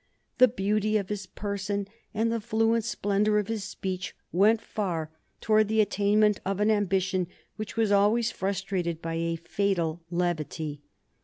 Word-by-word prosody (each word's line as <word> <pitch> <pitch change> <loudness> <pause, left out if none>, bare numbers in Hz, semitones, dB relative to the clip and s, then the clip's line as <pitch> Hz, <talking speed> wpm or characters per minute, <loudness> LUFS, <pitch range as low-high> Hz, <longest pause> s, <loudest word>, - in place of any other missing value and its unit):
The 255 - +9
beauty 215 -1 +1
of 200 -2 -3
his 205 -2 -4
person 200 0 -3 0.2
and 225 +2 0
the 230 -1 -1
fluent 225 +1 +2
splendor 210 -1 +1
of 210 0 0
his 220 -3 -2
speech 190 -1 -4 0.2
went 210 +5 +4
far 170 -9 -3 0.3
towards 215 -1 +3
the 220 0 +2
attainment 205 0 +3
of 195 +1 -2
an 210 +1 +3
ambition 190 -3 +1 0.3
which 215 +1 -6
was 220 -2 +2
always 210 +3 +3
frustrated 190 -3 -2
by 165 0 -4
a 165 0 -1
fatal 170 -1 -1
levity. 160 -4 -2
200 Hz, 150 wpm, -28 LUFS, 185-215 Hz, 0.3 s, The